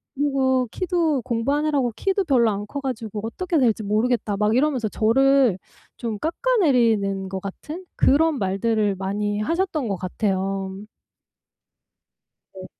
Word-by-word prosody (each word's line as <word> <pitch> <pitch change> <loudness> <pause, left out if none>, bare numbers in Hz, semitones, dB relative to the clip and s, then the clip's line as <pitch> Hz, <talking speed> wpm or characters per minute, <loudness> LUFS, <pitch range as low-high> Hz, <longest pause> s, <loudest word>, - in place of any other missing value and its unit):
그리고 265 -2 +1
키도 335 -6 0
공부하느라고 275 +2 0
키도 390 0 0
별로 250 -7 +3
안 205 0 -4
커 280 +7 -5
가지고 225 -6 -4
어떻게 340 +9 -2
될지 225 -4 +2
모르겠다." 215 +1 0
막 210 +2 +2
이러면서 260 -5 +1
저를 255 -1 +3 0.4
좀 230 -3 -4
깎아내리는 245 - +1
것 190 0 -4
같은 300 - -8
그런 305 +1 +3
말들을 205 +1 0
많이 205 +2 -2
하셨던 330 - -1
것 195 - 0
같아요. 190 0 -2 1.8
네. 185 -1 -9
235 Hz, 280 characters per minute, -23 LUFS, 205-285 Hz, 1.8 s, 별로